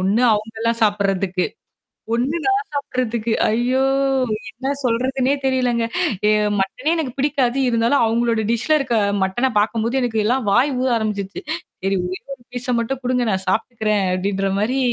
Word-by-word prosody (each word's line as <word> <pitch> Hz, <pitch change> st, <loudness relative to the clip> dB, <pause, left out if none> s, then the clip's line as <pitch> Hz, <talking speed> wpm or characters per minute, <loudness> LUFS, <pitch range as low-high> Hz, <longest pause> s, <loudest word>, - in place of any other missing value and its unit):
ஒண்ணு 200 Hz, +6 st, +2 dB
அவுங்களாம் 225 Hz, +2 st, -1 dB
சாப்பிட்றதுக்கு. 195 Hz, -3 st, +1 dB, 0.7 s
ஒண்ணு 255 Hz, +7 st, 0 dB
நான் 400 Hz, +2 st, +1 dB
சாப்பிட்றதுக்கு 240 Hz, -5 st, -2 dB, 0.2 s
ஐயோ! 245 Hz, +4 st, +1 dB, 0.7 s
என்ன 260 Hz, +4 st, -4 dB
சொல்றதுனே 255 Hz, +3 st, +1 dB
தெரியலங்க. 250 Hz, -3 st, +1 dB, 0.4 s
ஏ -, -, +5 dB, 0.3 s
மட்டனே 255 Hz, +11 st, 0 dB
எனக்கு 300 Hz, -7 st, -2 dB
பிடிக்காது. 275 Hz, -2 st, +1 dB
இருந்தாலும் 235 Hz, +2 st, +3 dB
அவுங்ளோட 230 Hz, 0 st, +1 dB
டிஷ்ல 270 Hz, +7 st, +2 dB
இருக்க 255 Hz, -4 st, 0 dB, 0.3 s
மட்டன 240 Hz, +8 st, 0 dB
பார்க்கும்போது, 225 Hz, +2 st, 0 dB
எனக்கு 230 Hz, -3 st, -1 dB
எல்லாம் 245 Hz, +1 st, +1 dB
வாய் 250 Hz, +8 st, +3 dB
ஊற 260 Hz, -, +1 dB
ஆரம்பிச்சிருச்சு. 200 Hz, -3 st, -3 dB, 0.4 s
சரி. 195 Hz, 0 st, +1 dB
ஒரே 185 Hz, +1 st, -4 dB
ஒரு 265 Hz, -3 st, -9 dB
பீஸ்ஸ 250 Hz, 0 st, -2 dB
மட்டும் 245 Hz, +3 st, -2 dB
கொடுங்க, 250 Hz, 0 st, +1 dB
நான் 190 Hz, -1 st, -2 dB
சாப்பிட்டுக்கிறேன், 215 Hz, 0 st, 0 dB
அப்பிடின்றமாரி 195 Hz, +5 st, 0 dB
235 Hz, 135 wpm, -20 LUFS, 210-255 Hz, 0.7 s, ஏ